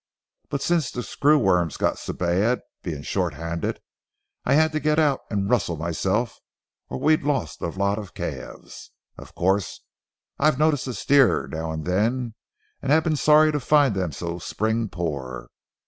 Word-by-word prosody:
But 140 - -2
since 165 -6 +1
the 125 - -5
screw 150 +6 +3
worms 90 - +2
got - - 0
so - - -5
bad, 95 +8 +1 0.2
being 75 -5 -5
short 90 -4 -1
handed, 80 +2 -3 0.7
I - - +3
had 160 +1 +4
to 155 - -1
get 150 +1 +1
out 150 -4 +3
and 100 -2 -1
rustle 100 -8 +1
myself 95 +8 -1 0.5
or 65 - -4
we'd 155 0 +3
lost 135 - -2
a - - -1
lot 100 +4 -1
of 100 -5 -10
calves. - - -7 0.3
Of - - -13
course, 95 +1 0 0.6
I 140 - +1
have 155 -4 +4
noticed 150 -3 +2
a 125 - -4
steer 140 -3 +3
now 80 0 -3
and 80 -1 -5
then, 115 +6 0 0.5
and - - -1
have 160 +1 +5
been 160 -2 +1
sorry 150 +3 +5
to 150 - -1
find 145 -2 +3
them 95 -4 -1
so 85 +4 -5
spring 110 +4 -1
poor. 70 -9 -5
110 Hz, 175 wpm, -24 LUFS, 85-145 Hz, 0.7 s, have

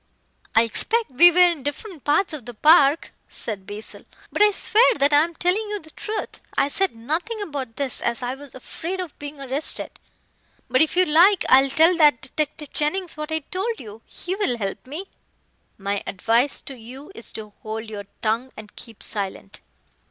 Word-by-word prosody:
"I 225 - +7
expect 445 - +1
we 340 +8 +8
were 350 - -4
in 340 -5 -1
different 290 - -6
parts 305 +5 +2
of 265 -6 -7
the 245 - -7
park," 300 +3 +5 0.2
said 200 -4 -5
Basil, 210 +1 -7 0.3
"but - - -2
I 420 - +8
swear 450 +4 +4
that 285 -3 +2
I 290 +1 +6
am 335 0 -5
telling 385 +6 0
you 415 0 -3
the 315 -2 -16
truth. 435 0 -5 0.2
I 275 - +3
said 385 -1 0
nothing 325 - -3
about 280 - -5
this, 275 -3 -2
as 235 +1 -1
I 245 +1 -2
was 275 -1 -12
afraid 335 +8 -6
of 360 -5 -6
being 290 0 -7
arrested. 275 +2 -3 0.7
But, 255 - +4
if 315 - +2
you 370 - +6
like, 345 +4 +5
I'll 270 +1 +6
tell 320 +6 +4
that 295 -7 +5
detective 300 +1 -4
Jennings 345 +4 -1
what 305 +1 -6
I 315 0 -1
told 430 +5 -2
you. 215 -1 -10
He 360 - -6
will 385 - -1
help 200 +3 -5
me." 310 +8 -6 0.7
"My 200 0 -2
advice 230 +8 +1
to 270 - -9
you 260 +8 -11
is 235 - -8
to 210 -1 -8
hold 220 +1 -5
your 205 -2 -7 0.2
tongue 230 +4 0
and 210 -1 -11
keep 230 -3 -9
silent." 200 0 -4
290 Hz, 190 wpm, -23 LUFS, 235-345 Hz, 0.7 s, we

